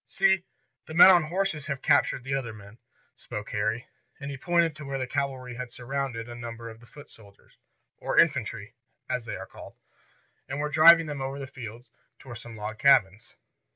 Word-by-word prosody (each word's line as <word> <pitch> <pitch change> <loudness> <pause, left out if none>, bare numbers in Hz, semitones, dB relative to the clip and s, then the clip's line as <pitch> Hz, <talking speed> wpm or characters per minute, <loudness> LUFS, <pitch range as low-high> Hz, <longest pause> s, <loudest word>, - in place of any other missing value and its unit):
"See, 190 -1 +2 0.4
the 160 - -8
men 175 +2 +10
on 175 -4 +4
horses 165 -3 -2
have 140 -2 -4
captured 145 -3 +2
the 135 +1 -4
other 125 -5 -3
men," 105 +1 -14 0.4
spoke 105 0 -8
Harry. 110 +3 -1 0.3
And 140 0 -6
he - - -5
pointed 170 +1 +1
to 150 - -10
where 135 -1 -4
the 130 - -2
cavalry 130 -2 -3
had 125 0 -7
surrounded 125 -2 -4
a 120 - -8
number 115 -1 -8
of 110 - -14
the 120 - -18
foot 145 +2 -14
soldiers, 100 -3 -20 0.4
or - - -3
infantry, - - +1 0.3
as - - -3
they - - -5
are - - -7
called, - - -13 0.7
and 140 +2 -4
were 150 0 -1
driving 165 +2 +7
them 145 -3 -5
over 135 +1 -4
the 140 - -6
fields 120 -3 -10 0.3
toward 120 -3 -10
some 120 -1 -11
log 105 +1 -6
cabins. 110 -6 +3
135 Hz, 190 wpm, -27 LUFS, 115-150 Hz, 0.7 s, men